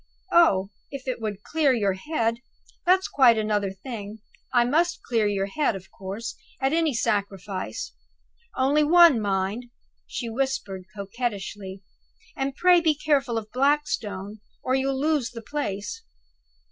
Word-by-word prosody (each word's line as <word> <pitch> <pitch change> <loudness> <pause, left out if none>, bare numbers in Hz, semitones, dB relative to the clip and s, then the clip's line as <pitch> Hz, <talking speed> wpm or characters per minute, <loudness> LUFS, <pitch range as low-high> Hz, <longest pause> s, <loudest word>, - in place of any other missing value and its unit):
"Oh, 200 - +4 0.2
if 275 -2 -8
it 255 -2 -2
would 210 -2 -4
clear 310 -4 +2
your 205 -5 +1
head, 230 +1 -1 0.5
that's 375 +1 +4
quite 245 -5 +5
another 210 -2 0
thing! 205 +1 -7 0.3
I 240 -1 +4
must 335 +7 +1
clear 225 -3 +1
your 200 -1 0
head, 225 +3 0
of 190 0 -10
course, 200 +4 -6 0.2
at 270 +2 +1
any 325 -2 +2
sacrifice. 205 - -2 0.6
Only 280 +4 +3
one, 330 -5 +7
mind," 200 +3 -1 0.4
she 240 - -4
whispered, 230 -6 -2
coquettishly; 200 -2 -5 0.5
"and 270 -2 -2
pray 355 +1 +5
be 315 -2 +3
careful 280 -5 +1
of 215 -1 -5
Blackstone, 225 -8 0 0.2
or 255 - 0
you'll 265 0 +1
lose 295 -4 +1
the 230 -1 -9
place." 285 - -4
235 Hz, 135 wpm, -25 LUFS, 205-285 Hz, 0.6 s, one